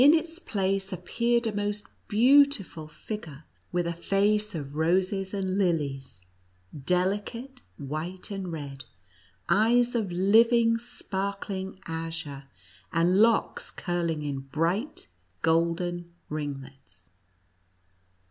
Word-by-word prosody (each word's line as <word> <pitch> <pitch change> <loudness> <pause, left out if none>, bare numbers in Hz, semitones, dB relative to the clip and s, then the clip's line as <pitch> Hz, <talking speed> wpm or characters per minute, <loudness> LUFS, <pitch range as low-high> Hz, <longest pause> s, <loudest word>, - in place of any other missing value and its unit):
85 305 +4 +8
its 335 +1 -9
place 195 - -1
appeared 235 +6 0
a 220 - -1
most 205 +1 -1 0.2
beautiful 240 - +4
figure, 160 -3 -7 0.3
with 175 -1 0
a 170 - -1
face 205 +4 +1
of 145 -2 -5
roses 185 +4 +1
and 195 -1 -1
lilies, 140 - -1 0.5
delicate 205 - -1 0.2
white 155 +8 -4
and 195 -3 -4
red, 140 -4 -6 0.6
eyes 240 +3 +4
of 220 -6 -1
living, 230 +5 +4
sparkling 195 -4 -4
azure, 160 -4 -5 0.5
and 175 +4 +3
locks 230 0 +2
curling 170 -4 -2
in 140 -2 -2
bright 165 - -1 0.4
golden 170 +1 +1 0.2
ringlets. 135 - -7
185 Hz, 100 wpm, -28 LUFS, 160-210 Hz, 0.6 s, 85